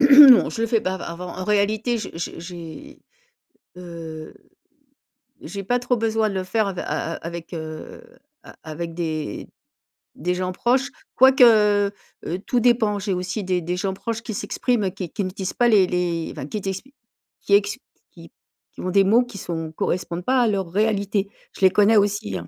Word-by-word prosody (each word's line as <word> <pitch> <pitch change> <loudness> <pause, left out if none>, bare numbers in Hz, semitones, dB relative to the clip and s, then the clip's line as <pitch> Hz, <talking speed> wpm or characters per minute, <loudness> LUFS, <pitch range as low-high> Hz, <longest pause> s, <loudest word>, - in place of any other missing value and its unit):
non, 275 -2 +9
je 225 - -5
le - - +2
fais 225 -1 +1
pas 185 - -2
av 190 - -7
avant. 175 +2 -6
En 185 - -4
réalité, 215 +4 +1
j'ai - - -6
j'ai 165 0 -5
j'ai, 175 - -10 0.8
heu, 165 -3 -9 1.1
j'ai 195 +5 -6
pas 245 +6 0
trop 245 0 0
besoin 220 -1 +1
de 195 - -5
le 185 - -1
faire 210 +2 0
av 190 - -5
a - - -3
a 165 - -3
avec 170 0 -7
heu, 155 -1 -8 0.4
a - - -14
avec 165 +1 -6
des 160 -7 -4 0.7
des 180 +1 -1
gens 185 0 -2
proches, 255 +7 +1 0.3
quoique, 260 0 +6 0.8
heu, 175 +3 -3
tout 245 - +2
dépend. 230 -3 +3
J'ai 195 0 -2
aussi 185 +4 -3
des 180 -1 0
des 175 +2 -3
gens 190 +1 -2
proches 225 +3 -4
qui 230 -2 -6
s'expriment, 205 +1 -1
qui 185 -2 -6
qui 200 - -3
n'utilisent 185 0 -4
pas 240 - +2
les 205 -5 +5
les 175 -2 -2
enfin, 135 - -7
qui 210 +6 -4
t'exp 195 +5 -5 0.5
qui 200 - -1
ex 205 +2 +1 0.3
qui - - -15 0.4
qui - - -11
ont 185 - -2
des 195 +1 +5
mots 225 +6 +4
qui 245 -4 -11
sont 165 -3 -5
correspondent 175 +1 -2
pas 260 0 +3
à 240 - +3
leur 195 -4 -1
réalité. 200 0 0 0.3
Je - - -13
les 190 - +7
connais 210 +3 +4
aussi, 205 +1 0
hein. - - -8
195 Hz, 190 wpm, -22 LUFS, 175-225 Hz, 1.1 s, non